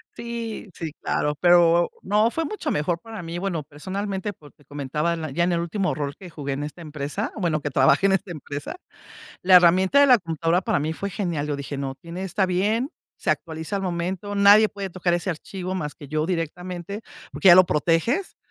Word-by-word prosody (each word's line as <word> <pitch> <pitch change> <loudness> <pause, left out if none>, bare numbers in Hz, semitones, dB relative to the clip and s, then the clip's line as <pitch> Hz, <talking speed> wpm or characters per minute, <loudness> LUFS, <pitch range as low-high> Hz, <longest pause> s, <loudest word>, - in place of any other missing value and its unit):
Sí, 230 -3 -6
sí, 160 -2 -5
claro, 150 0 0
pero 175 -1 +5
no 210 +3 +3
fue 325 +6 -2
mucho 425 - -4
mejor 165 +3 0
para 220 -5 -8
mí, 170 +1 -5
bueno 175 -5 -2
personalmente, 190 +7 -4
porque 145 -4 -18
comentaban 150 +2 -3
ya 170 - +1
en 175 0 +1
el 170 - +1
último 185 +3 -1
rol 145 -2 -3
que 185 - -11
jugué 145 -4 -4
en 140 +2 -3
esta 150 +3 -7
empresa, 150 +7 -4
bueno, 165 -7 0
que 145 - -3
trabaje 135 +8 +4
en 195 - +4
esta 195 0 0
empresa, 145 - -6 0.7
la 185 0 +7
herramienta 185 +8 +5
de 285 - +7
la 250 -2 +7
computadora 165 0 0
para - - 0
mí 155 +2 -1
fue 200 +5 -4
genial, 175 -7 -2
yo 145 -1 -2
dije: 140 0 -5
"No, 135 -1 -3
tiene 170 +7 -8
está 190 +1 0
bien, 210 +9 0 0.3
se - - -1
actualiza 160 +3 -3
al 195 - -3
momento, 185 +3 -3
nadie 205 +2 +7
puede 200 -2 -6
tocar 175 -1 0
ese 175 +2 -1
archivo 185 +2 -5
más 150 -5 -3
que 145 - -11
yo 155 +2 -1
directamente", 180 +3 -4 0.3
porque 190 - +3
ya 175 - +11
lo 185 +1 +8
proteges. 175 - 0
175 Hz, 200 wpm, -24 LUFS, 155-195 Hz, 0.7 s, ya